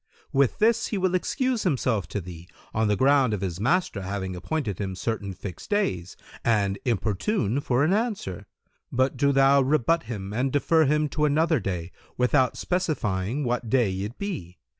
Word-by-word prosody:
With 135 Hz, -2 st, +2 dB
this 230 Hz, +1 st, +3 dB
he 210 Hz, -, -2 dB
will 185 Hz, -1 st, +1 dB
excuse 255 Hz, +6 st, 0 dB
himself 125 Hz, -, 0 dB
to 105 Hz, -, -3 dB
thee, 85 Hz, -2 st, -10 dB, 0.3 s
on 110 Hz, 0 st, +1 dB
the 105 Hz, -, +2 dB
ground 135 Hz, -2 st, +3 dB
of 100 Hz, -, -6 dB
his 90 Hz, -2 st, -3 dB
master 160 Hz, -, +1 dB
having 95 Hz, -1 st, -4 dB
appointed 105 Hz, -, -3 dB
him 95 Hz, -2 st, -3 dB
certain 100 Hz, 0 st, -3 dB
fixed 90 Hz, -1 st, -8 dB
days, 95 Hz, -, -1 dB, 0.3 s
and 100 Hz, -4 st, +1 dB
importune 115 Hz, -, 0 dB
for 130 Hz, 0 st, +1 dB
an 165 Hz, +5 st, +3 dB
answer; 205 Hz, -, -2 dB, 0.4 s
but 130 Hz, +2 st, +1 dB
do 140 Hz, +2 st, +2 dB
thou 135 Hz, 0 st, +5 dB
rebut 155 Hz, +4 st, +2 dB
him 100 Hz, -3 st, -5 dB
and 130 Hz, +4 st, 0 dB
defer 160 Hz, +3 st, +3 dB
him 150 Hz, +2 st, +2 dB
to 150 Hz, +1 st, 0 dB
another 155 Hz, +1 st, +2 dB
day, 90 Hz, -4 st, -4 dB, 0.3 s
without 125 Hz, 0 st, +2 dB
specifying 130 Hz, -, -1 dB
what 120 Hz, -2 st, -1 dB
day 120 Hz, -7 st, +2 dB
it 105 Hz, +5 st, -5 dB
be. 145 Hz, -, -5 dB
125 Hz, 170 wpm, -26 LUFS, 100-155 Hz, 0.4 s, thou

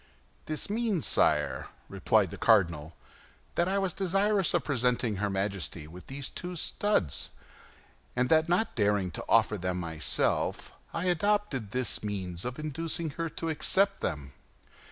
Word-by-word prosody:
"This 155 Hz, -1 st, -1 dB
means, 215 Hz, -5 st, 0 dB
sire," -, -, +2 dB, 0.2 s
replied -, -, +2 dB
the -, -, -6 dB
cardinal, 85 Hz, -8 st, +3 dB, 0.6 s
"that 170 Hz, -, +1 dB
I 195 Hz, +1 st, +1 dB
was 195 Hz, -2 st, 0 dB
desirous 195 Hz, 0 st, +2 dB
of -, -, +2 dB
presenting 125 Hz, -5 st, +1 dB
her 105 Hz, +1 st, 0 dB
Majesty 95 Hz, -5 st, -2 dB
with 90 Hz, +4 st, -12 dB
these 135 Hz, 0 st, -4 dB
two 180 Hz, 0 st, -5 dB
studs, 170 Hz, -, 0 dB, 0.9 s
and 125 Hz, 0 st, +2 dB
that 160 Hz, +1 st, +4 dB
not 180 Hz, +6 st, +2 dB
daring 100 Hz, -4 st, +1 dB
to -, -, -6 dB
offer -, -, +4 dB
them 90 Hz, 0 st, -2 dB
myself, 80 Hz, -2 st, 0 dB, 0.2 s
I 165 Hz, +2 st, -3 dB
adopted 180 Hz, -, +1 dB
this 125 Hz, -1 st, -1 dB
means 95 Hz, -4 st, -4 dB
of 125 Hz, 0 st, -4 dB
inducing 160 Hz, +2 st, -2 dB
her 165 Hz, +3 st, -3 dB
to 165 Hz, +1 st, -4 dB
accept 195 Hz, +5 st, +2 dB
them." 75 Hz, -4 st, -3 dB
135 Hz, 145 wpm, -29 LUFS, -, 0.9 s, that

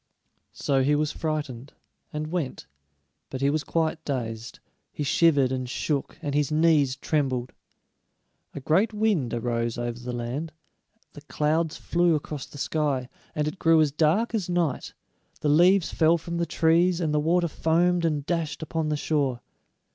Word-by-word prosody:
So 135 Hz, -1 st, +1 dB
he 145 Hz, +3 st, +3 dB
was 150 Hz, 0 st, 0 dB
frightened, 150 Hz, -5 st, -4 dB, 0.4 s
and 155 Hz, +1 st, -4 dB
went; 170 Hz, -7 st, -3 dB, 0.6 s
but 130 Hz, -, -5 dB
he 140 Hz, +1 st, +3 dB
was 155 Hz, 0 st, -1 dB
quite 160 Hz, -1 st, -1 dB
dazed. 115 Hz, -4 st, -4 dB, 0.3 s
He 150 Hz, -, -4 dB
shivered 145 Hz, -3 st, +3 dB
and 130 Hz, -1 st, -3 dB
shook, 140 Hz, +2 st, -2 dB
and 145 Hz, -2 st, -2 dB
his 150 Hz, +1 st, +1 dB
knees 150 Hz, -4 st, +3 dB
trembled. 130 Hz, -3 st, -1 dB, 1.0 s
A 145 Hz, -, -5 dB
great 195 Hz, -, +2 dB
wind 205 Hz, -, +1 dB
arose 115 Hz, -1 st, -2 dB
over 120 Hz, 0 st, -3 dB
the 125 Hz, 0 st, -5 dB
land, 125 Hz, +7 st, -4 dB, 0.6 s
the 145 Hz, -, -11 dB
clouds 155 Hz, +2 st, 0 dB
flew 170 Hz, -1 st, +2 dB
across 150 Hz, -2 st, -5 dB
the -, -, -12 dB
sky, 140 Hz, -4 st, -1 dB, 0.3 s
and 150 Hz, 0 st, 0 dB
it 165 Hz, +5 st, -5 dB
grew 165 Hz, -1 st, +5 dB
as 155 Hz, -2 st, +3 dB
dark 165 Hz, +11 st, +1 dB
as 200 Hz, -6 st, -1 dB
night; 175 Hz, -4 st, -1 dB, 0.5 s
the 150 Hz, -, +1 dB
leaves 175 Hz, +4 st, +4 dB
fell 165 Hz, +1 st, +4 dB
from 170 Hz, +1 st, -5 dB
the 170 Hz, 0 st, -1 dB
trees, 170 Hz, +2 st, +3 dB
and 160 Hz, -4 st, 0 dB
the 150 Hz, -, +3 dB
water 170 Hz, +3 st, +2 dB
foamed 170 Hz, +3 st, +1 dB
and 150 Hz, -4 st, 0 dB
dashed 165 Hz, -2 st, -2 dB
upon 160 Hz, -1 st, -2 dB
the 150 Hz, -, 0 dB
shore. 140 Hz, -5 st, 0 dB
150 Hz, 160 wpm, -26 LUFS, 135-165 Hz, 1.0 s, grew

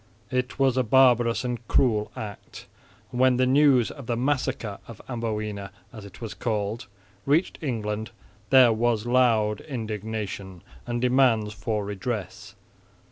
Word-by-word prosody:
It 125 Hz, 0 st, -2 dB
was 135 Hz, -2 st, +2 dB
a 130 Hz, -, +3 dB
barbarous 120 Hz, -1 st, +4 dB
and 120 Hz, -1 st, -2 dB
cruel 110 Hz, -5 st, +2 dB
act; 105 Hz, -2 st, -8 dB, 0.5 s
and 125 Hz, -, -4 dB
when 130 Hz, -1 st, +4 dB
the 130 Hz, -, +3 dB
news 130 Hz, -2 st, +4 dB
of 135 Hz, -5 st, -11 dB
the 120 Hz, -, -1 dB
"massacre 130 Hz, -5 st, -1 dB
of 115 Hz, -3 st, -11 dB
Amboina," 105 Hz, -4 st, -4 dB, 0.2 s
as 110 Hz, -4 st, -9 dB
it 95 Hz, -2 st, -13 dB
was 115 Hz, -3 st, -6 dB
called, 105 Hz, -2 st, -3 dB, 0.4 s
reached 155 Hz, +6 st, +1 dB
England, 110 Hz, -6 st, -3 dB, 0.4 s
there 130 Hz, -3 st, +7 dB
was 115 Hz, -1 st, 0 dB
loud 115 Hz, -4 st, +2 dB
indignation 110 Hz, -, -5 dB, 0.2 s
and 120 Hz, 0 st, -2 dB
demands 125 Hz, -4 st, +3 dB
for 105 Hz, 0 st, -3 dB
redress. 105 Hz, 0 st, -5 dB
115 Hz, 135 wpm, -25 LUFS, 105-125 Hz, 0.5 s, there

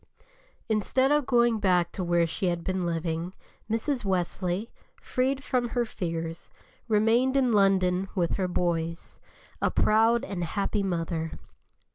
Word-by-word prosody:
Instead 230 Hz, +5 st, +1 dB
of 295 Hz, -2 st, +2 dB
going 235 Hz, -3 st, +3 dB
back 180 Hz, -4 st, +2 dB
to 185 Hz, -, -4 dB
where 175 Hz, -1 st, +2 dB
she 165 Hz, +3 st, -2 dB
had 175 Hz, -1 st, -1 dB
been 185 Hz, -1 st, -1 dB
living, 165 Hz, +1 st, -3 dB, 0.3 s
Mrs. 240 Hz, +4 st, -1 dB
Wesley, 185 Hz, +2 st, -1 dB, 0.3 s
freed 265 Hz, +1 st, -1 dB
from 250 Hz, -4 st, 0 dB
her 240 Hz, 0 st, 0 dB
fears, 165 Hz, -5 st, -5 dB, 0.4 s
remained 230 Hz, +5 st, +3 dB
in 255 Hz, -3 st, +3 dB
London 195 Hz, -2 st, +3 dB
with 175 Hz, -3 st, +1 dB
her 190 Hz, -2 st, 0 dB
"boys," 170 Hz, -2 st, -2 dB, 0.4 s
a -, -, +3 dB
proud 225 Hz, +4 st, +3 dB
and 190 Hz, -8 st, -4 dB
happy 200 Hz, +4 st, -1 dB
mother. 165 Hz, -3 st, -2 dB
195 Hz, 135 wpm, -27 LUFS, 175-235 Hz, 0.4 s, going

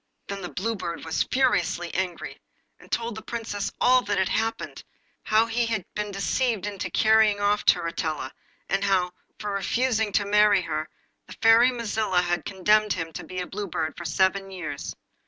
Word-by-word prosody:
Then 200 Hz, 0 st, -5 dB
the 180 Hz, -, -5 dB
Blue 225 Hz, +5 st, -2 dB
Bird 170 Hz, -5 st, -5 dB
was 160 Hz, -, 0 dB
furiously 250 Hz, -9 st, +1 dB
angry, 180 Hz, -1 st, -3 dB, 0.4 s
and -, -, -18 dB
told 230 Hz, 0 st, -1 dB
the 220 Hz, -, -7 dB
Princess 220 Hz, -4 st, -4 dB
all 255 Hz, 0 st, +5 dB
that 205 Hz, 0 st, 0 dB
had 190 Hz, 0 st, +1 dB
happened, 225 Hz, +1 st, -2 dB, 0.4 s
how 220 Hz, +1 st, +3 dB
he 230 Hz, +1 st, 0 dB
had 220 Hz, -6 st, -2 dB
been 210 Hz, 0 st, -3 dB
deceived 200 Hz, +3 st, 0 dB
into 205 Hz, -2 st, -4 dB
carrying 220 Hz, -2 st, +4 dB
off 205 Hz, +1 st, +2 dB
Turritella, 165 Hz, -2 st, +1 dB, 0.4 s
and 195 Hz, 0 st, 0 dB
how, 185 Hz, -3 st, +2 dB, 0.3 s
for 210 Hz, -1 st, -4 dB
refusing 220 Hz, +2 st, 0 dB
to 205 Hz, -, +2 dB
marry 205 Hz, -2 st, +4 dB
her, 155 Hz, -1 st, -3 dB, 0.4 s
the -, -, -9 dB
Fairy 225 Hz, +2 st, +6 dB
Mazilla 220 Hz, -6 st, 0 dB
had 175 Hz, 0 st, -1 dB
condemned 210 Hz, +2 st, +2 dB
him 165 Hz, 0 st, -5 dB
to -, -, -6 dB
be 185 Hz, 0 st, -5 dB
a -, -, -3 dB
Blue 205 Hz, +2 st, -5 dB
Bird 160 Hz, -2 st, -3 dB
for 175 Hz, -, -8 dB
seven 190 Hz, +4 st, +1 dB
years. 175 Hz, -7 st, -6 dB
205 Hz, 175 wpm, -25 LUFS, 180-220 Hz, 0.4 s, Fairy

